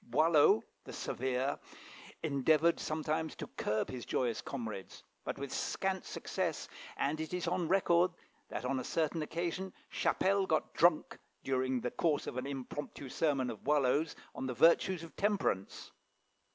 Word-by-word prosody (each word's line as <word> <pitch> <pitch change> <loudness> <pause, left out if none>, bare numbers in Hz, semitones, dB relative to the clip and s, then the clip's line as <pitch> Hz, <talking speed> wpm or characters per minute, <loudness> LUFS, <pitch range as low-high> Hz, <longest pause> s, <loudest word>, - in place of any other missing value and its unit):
Boileau, 150 -2 +5 0.2
the - - -9
Severe, 130 +2 -1 0.6
endeavoured 155 +3 +3
sometimes 155 0 -1
to - - -5
curb 110 +1 -2
his 125 -2 -5
joyous 120 -3 0
comrades, 110 -7 -6 0.2
but - - -3
with 140 -1 -5
scant 190 -1 -1
success, - - -2 0.3
and 150 +3 0
it 160 +3 -3
is 180 - -2
on 175 -3 0
record 180 -1 +4 0.4
that - - -4
on 130 +1 0
a - - -3
certain 160 +2 0
occasion 170 +4 -3 0.2
Chapelle 195 0 +2
got 155 -1 0
drunk 170 -2 +3 0.2
during 130 -1 0
the 125 - -2
course 160 -4 +1
of - - -5
an 130 +1 -2
impromptu 140 0 -6
sermon 135 -4 +1
of 110 - -10
Boileau's 145 +2 +2 0.2
on 130 - -4
the 125 - -3
virtues 170 - +4
of 165 - -11
temperance. 200 - -1
150 Hz, 150 wpm, -34 LUFS, 130-170 Hz, 0.6 s, Boileau